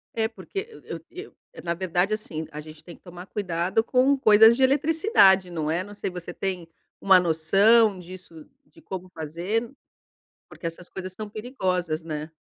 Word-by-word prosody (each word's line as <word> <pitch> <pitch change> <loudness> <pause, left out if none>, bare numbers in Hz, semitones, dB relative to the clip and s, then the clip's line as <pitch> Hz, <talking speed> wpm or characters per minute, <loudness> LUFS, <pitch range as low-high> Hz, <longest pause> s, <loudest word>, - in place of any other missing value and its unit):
É 220 -1 +1
porque 390 - -7 0.2
eu 165 - -7
eu 375 +5 -10 0.2
eu - - -11
na 170 -1 -1
verdade, 185 +3 0
assim, 160 -7 -4
a 150 - -7
gente 155 0 -13
tem 170 - -11
que - - -25
tomar 180 0 -11
cuidado 190 +1 -1
com 265 +3 +3
coisas 220 -2 +7
de 265 - +1
eletricidade, 275 - +4
não 155 -3 -3
é. 170 +3 0
Não 205 +1 -12
sei 200 - -4
você 175 -1 -8
tem 185 -3 -4 0.3
uma 190 -2 +6
noção 195 +6 +4
disso 180 -3 -12 0.2
de 325 - -21
como 185 - -7
fazer, 180 +9 -3 0.8
porque 170 - -9
essas 165 +2 -7
coisas 185 -1 -7
são 215 +2 -7
perigosas, 185 - -3
né. 155 -1 -6
185 Hz, 175 wpm, -25 LUFS, 170-220 Hz, 0.8 s, coisas